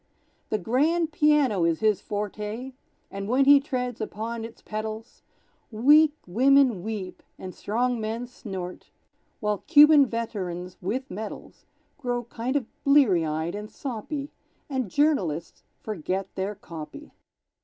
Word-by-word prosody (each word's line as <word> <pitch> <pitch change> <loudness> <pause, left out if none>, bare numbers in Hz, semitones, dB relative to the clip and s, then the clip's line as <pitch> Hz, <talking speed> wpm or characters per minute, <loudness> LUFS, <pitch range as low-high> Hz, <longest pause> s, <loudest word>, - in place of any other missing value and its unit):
The 215 - +1
grand 305 - +1
piano 295 - +3
is 165 -1 +1
his 215 -2 +2
forte, 210 +5 -4 0.4
And 195 0 -5
when 260 +4 +3
he 285 0 +8
treads 250 -4 -3
upon 225 +2 -4
its 230 +1 -9
pedals, 220 +1 -6 0.5
Weak 295 +7 +5
women 255 +1 +4
weep, 190 -3 -5 0.2
and 185 -1 -8
strong 240 +3 -1
men 225 +3 -3
snort, 190 -7 -8 0.5
While 210 -2 0
Cuban 295 -2 +8
veterans 185 -6 -4
(with 250 +9 -3
medals) 215 +3 -8 0.3
Grow 245 -3 -2
kind 240 +3 -4
of 280 - +1 0.2
bleary 270 - +5
eyed 160 +2 -2
and 210 +1 -6
soppy; 275 +3 -5 0.4
And 260 -7 -2
journalists 185 - 0 0.2
forget 190 -1 -3
their 195 +2 -3
"copy." 180 - -10
225 Hz, 125 wpm, -26 LUFS, 195-270 Hz, 0.5 s, he